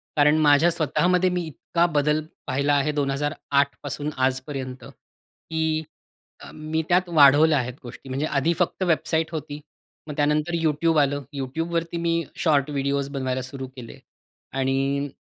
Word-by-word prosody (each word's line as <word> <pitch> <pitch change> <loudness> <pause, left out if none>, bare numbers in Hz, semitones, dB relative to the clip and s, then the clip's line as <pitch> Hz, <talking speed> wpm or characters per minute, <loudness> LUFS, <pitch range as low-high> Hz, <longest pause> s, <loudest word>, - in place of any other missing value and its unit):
कारण 150 +1 +4
माझ्या 150 +2 +5
स्वतःमध्ये 180 +3 +2
मी 180 -1 -1
इतका 170 +3 -1
बदल 150 +1 +2 0.3
पाहिला 140 +2 +1
आहे 145 +2 +1
2008 140 0 0
पासून 150 +1 -2
आजपर्यंत 130 0 -2
की 160 -1 -5 0.6
अ, - - -10
मी 155 +1 -2
त्यात 180 0 +2
वाढवल्या 150 0 +6
आहेत 125 0 -3
गोष्टी 125 +2 -11
म्हणजे 135 +3 -1
आधी 150 +2 +1
फक्त 180 +1 0
वेबसाईट 165 -1 0
होती. 150 -2 -5 0.5
मग 150 - -6
त्यानंतर 150 +3 +1
YouTube 155 +1 +2
आलं. 145 0 0 0.2
YouTubeवरती 165 +5 -2
मी 170 0 0
शॉर्ट 150 -3 +2
व्हिडिओज 140 0 -1
बनवायला 130 -2 -2
सुरू 130 0 -7
केले 120 -3 -10 0.6
आणि 135 +2 0
145 Hz, 140 wpm, -24 LUFS, 140-160 Hz, 0.6 s, वाढवल्या